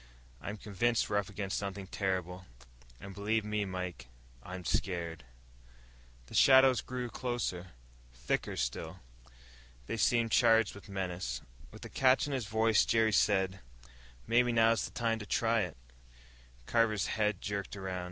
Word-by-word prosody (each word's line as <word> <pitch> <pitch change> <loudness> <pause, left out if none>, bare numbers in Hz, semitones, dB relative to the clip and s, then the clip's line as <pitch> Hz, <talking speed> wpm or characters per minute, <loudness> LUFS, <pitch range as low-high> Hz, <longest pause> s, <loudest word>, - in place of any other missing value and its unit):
"I'm 105 - -5
convinced 110 +4 0
we're 100 - +3
up 100 - -5
against 100 -1 -3
something 100 -1 -5
terrible. 90 -2 -3 0.5
And 100 0 -9
believe 105 +2 -1
me, 105 -1 -1
Mike, 90 -9 -5 0.3
I'm 90 +5 -8
scared." 85 -5 -2 1.0
The - - -15
shadows 130 -1 +6
drew 125 -1 -4
closer, 115 -8 -4 0.4
thicker - - -2
still. 80 +9 -3 0.8
They 115 - -4
seemed 115 +1 +2
charged 115 -3 +4
with 100 0 -13
menace. 90 -10 -4 0.3
With - - -11
a - - -8
catch 130 0 +3
in 145 - -4
his 125 -6 -2
voice, 110 0 +3
Jerry 110 -1 +2
said, 95 -2 +2 0.7
"Maybe 120 +1 +3
now's 115 0 +3
the - - -6
time 115 -2 -1
to 105 - -7
try 115 +1 +2
it." 90 - -4 0.9
Carver's 110 - +2
head 105 -3 0
jerked 100 -1 -4
around. 95 -1 -4
100 Hz, 140 wpm, -32 LUFS, 95-115 Hz, 1.0 s, shadows